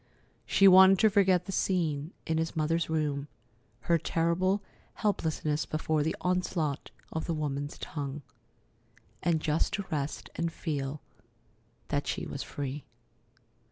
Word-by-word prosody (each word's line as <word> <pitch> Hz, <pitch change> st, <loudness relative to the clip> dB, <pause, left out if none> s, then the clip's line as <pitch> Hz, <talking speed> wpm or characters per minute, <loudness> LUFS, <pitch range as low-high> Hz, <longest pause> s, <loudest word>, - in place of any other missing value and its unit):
She 195 Hz, -, +6 dB
wanted 190 Hz, +1 st, +9 dB
to 220 Hz, +3 st, +4 dB
forget 190 Hz, -3 st, +4 dB
the -, -, -5 dB
scene 165 Hz, -6 st, 0 dB
in 160 Hz, 0 st, 0 dB
his 160 Hz, 0 st, -2 dB
mother's 160 Hz, +1 st, 0 dB
room, 150 Hz, -3 st, -1 dB, 0.5 s
her 170 Hz, -1 st, +2 dB
terrible 175 Hz, +5 st, +1 dB, 0.3 s
helplessness 160 Hz, -7 st, -1 dB
before 155 Hz, 0 st, 0 dB
the 160 Hz, +2 st, 0 dB
onslaught 180 Hz, -5 st, -1 dB, 0.2 s
of 160 Hz, -, -3 dB
the 165 Hz, -, -1 dB
woman's 145 Hz, -1 st, -3 dB
tongue; 145 Hz, -1 st, -5 dB, 1.0 s
and 170 Hz, -2 st, +2 dB
just 155 Hz, +1 st, 0 dB
to 200 Hz, -, -2 dB
rest 145 Hz, -1 st, -3 dB
and 170 Hz, 0 st, -1 dB
feel 145 Hz, -3 st, -3 dB, 0.9 s
that 145 Hz, -1 st, -1 dB
she -, -, -2 dB
was 140 Hz, -, -5 dB
free. 140 Hz, 0 st, -5 dB
160 Hz, 130 wpm, -30 LUFS, 150-180 Hz, 1.0 s, wanted